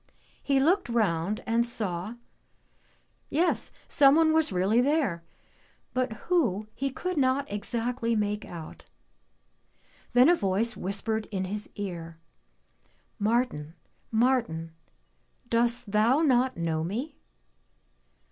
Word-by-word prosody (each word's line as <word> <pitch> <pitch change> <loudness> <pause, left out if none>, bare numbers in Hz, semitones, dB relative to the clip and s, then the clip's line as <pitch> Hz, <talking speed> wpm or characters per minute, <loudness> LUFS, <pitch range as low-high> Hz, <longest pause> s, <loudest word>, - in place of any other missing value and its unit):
He 275 -2 +2
looked 350 +4 +2
round 205 -4 0
and 230 0 +2
saw 210 -3 -3 0.6
— - - -39
^yes 335 +5 +1 0.2
someone 315 +2 +5
was 320 -5 +2
really 195 +6 +2
there, 260 - +1 0.7
but 255 -1 0 0.2
who 235 - +1
he 275 +3 -2
could 365 +6 -4
not 270 0 +2
exactly 230 +3 -1
make 210 0 -1
out. 165 -3 -9 1.3
Then 250 +2 +7
a 345 - +7
voice 210 - 0
whispered 215 +3 -2
in 190 -3 -3
his 205 +3 -5
ear, 170 -5 -6 1.0
"Martin, 205 -8 0 0.3
Martin, 220 -9 +1 0.8
does 235 +1 +2
thou 225 +7 +2
not 260 - +2
know 160 -2 -1
me?' 245 - -4
230 Hz, 110 wpm, -28 LUFS, 195-260 Hz, 1.3 s, Then